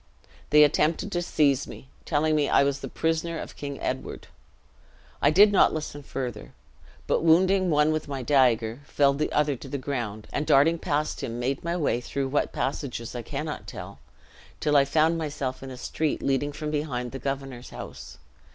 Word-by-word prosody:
They 150 0 +7
attempted 155 +6 +2
to 175 - 0
seize 140 -5 +2
me, - - -11 0.2
telling 155 0 +1
me 145 -2 +1
I - - +5
was 140 0 0
the - - -6
prisoner 165 +1 -1
of - - -7
King 140 -1 -6
Edward. 130 +1 -4 1.0
I 145 - +5
did 200 +7 +6
not 200 - +4
listen 150 -2 -5
further, 125 -6 -6 0.5
but - - +1
wounding 185 +3 +4
one 150 0 +3
with 155 0 -2
my 135 -2 -4
dagger, 120 -4 +2
felled 140 -1 +2
the 155 - 0
other 150 -1 +2
to 135 - -10
the 140 - -3
ground; 120 -6 -4
and 150 - -2
darting 160 +5 +4
past 150 0 -1
him, 115 -1 -4
made 130 +3 -2
my 170 +1 -1
way 140 -7 0
through 135 +2 -3
what 145 - 0
passages 130 -4 -3
I 120 - -4
cannot 150 +5 -5
tell, - - -8 0.6
till 150 -1 +1
I 140 -1 +6
found 160 +3 +2
myself 145 -4 -4
in 135 - -7
a 130 - -8
street 155 +3 -2
leading 140 +2 0
from 150 +1 -5
behind 135 -5 -2
the 135 - -6
governor's 135 -3 -5
house. - - -9
145 Hz, 185 wpm, -26 LUFS, 135-155 Hz, 1.0 s, They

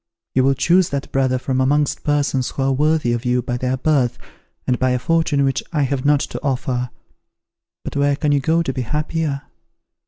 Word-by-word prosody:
You 130 - +3
will 135 +1 +3
choose 175 +6 +3
that 140 -1 -4
brother 130 -1 +1
from 130 +1 -1
amongst 145 +2 +1
persons 145 -3 0
who 135 - -3
are 135 - +2
worthy 150 -2 +2
of 120 0 -2
you 125 -1 +1
by 120 - -2
their 130 +1 -1
birth, 130 -4 +1 0.5
and 125 - 0
by 130 - +2
a - - +1
fortune 155 +1 +1
which 135 -1 +1
I 150 -4 +1
have 135 0 -1
not 145 -1 +4
to - - -5
offer. 130 -2 -1 0.9
But - - -6
where 140 0 +2
can 150 0 0
you 145 - +3
go 165 +4 +1
to 135 - -2
be 130 - -3
happier? 150 +2 -2
135 Hz, 205 wpm, -20 LUFS, 130-150 Hz, 0.9 s, not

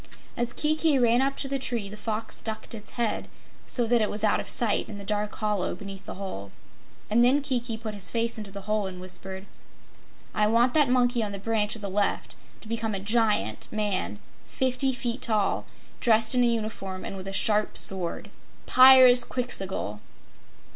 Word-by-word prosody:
As 240 0 -2
Kiki 310 -1 +2
ran 240 0 +3
up 275 +1 -1
to 275 - -2
the 275 0 -2
tree 235 -5 -2
the 205 - -9
Fox 220 +1 -4
ducked 220 +1 -5
its 210 -2 -9
head, 235 -2 -1 0.4
so 240 - 0
that 235 0 +2
it 215 - 0
was 210 +1 -4
out 215 - +2
of - - -4
sight 225 -4 +1
in 210 - -8
the 200 - -9
dark 210 +1 -3
hollow 210 -4 -2
beneath 195 -2 -10
the - - -7
hole, 140 - -7 0.6
and 230 +3 +3
then 260 +4 +4
Kiki 240 -4 -2
put 220 -1 -6
his 200 -3 +3
face 230 0 +1
into 210 -2 -7
the 200 0 -9
hole 210 0 -1
and 185 -1 -8
whispered: 190 +1 -4 0.9
"I 210 - +2
want 235 +3 +2
that 295 -4 +3
monkey 245 -1 +2
on 205 -2 -3
the - - -5
branch 215 +1 0
at 220 - -11
the - - -3
left 200 +1 -1 0.3
to - - -13
become 225 -1 -2
a - - -3
Giant 210 - 0
man 205 - -2 0.3
fifty 260 +1 0
feet 245 -1 -3
tall, 215 -4 0 0.3
dressed 220 0 +3
in 250 -1 +3
a - - +4
uniform 215 -5 -3
and - - -6
with 190 0 -8
a - - -4
sharp 210 +2 +1
sword 185 -3 +4 0.3
Pyrzqxgl!" 245 - +4
220 Hz, 190 wpm, -26 LUFS, 200-240 Hz, 0.9 s, then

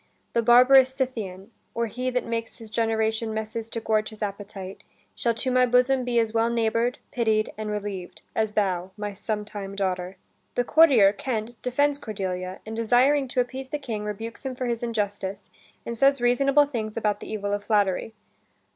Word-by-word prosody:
"The 235 - +3
barbarous 255 +3 +6
Scythian, 220 -7 -4 0.2
Or 235 0 +1
he 250 +3 -3
that 250 0 -1
makes 230 -1 -4
his 225 -2 -10
generation 220 0 0
messes 220 +1 -4
To 230 - -4
gorge 215 -1 0
his 215 0 -7
appetite, 200 -1 -6 0.3
shall 235 -1 0
to 255 +3 0
my 255 0 +4
bosom 250 +2 +3
Be 245 -1 -1
as 225 -1 +2
well 230 0 +2
neighbour'd, 230 +1 +1
pitied, 220 -3 +1
and 215 0 -5
relieved. 205 -3 -5
As 220 -1 0
thou, 185 -3 0
my 210 -1 -4
sometime 205 -1 -5
daughter." 185 -1 -2 0.4
The 245 - +2
courtier, 250 -10 +6
Kent, 230 0 -4
defends 285 +3 +1
Cordelia, 185 -5 -4
and 220 +1 -6
desiring 255 +5 +3
to 250 0 +1
appease 260 +2 -5
the 295 - -3
King, 230 -7 -5
rebukes 225 +4 -6
him 265 -2 -4
for 255 - -3
his 235 -1 -1
injustice, 205 -4 -3 0.3
and 235 - -4
says 275 +3 +4
reasonable 275 +4 +4
things 225 -6 -4
about 210 -2 0
the - - -8
evil 205 -1 -2
of 205 0 -2
flattery. 205 0 +1
225 Hz, 175 wpm, -25 LUFS, 210-245 Hz, 0.4 s, barbarous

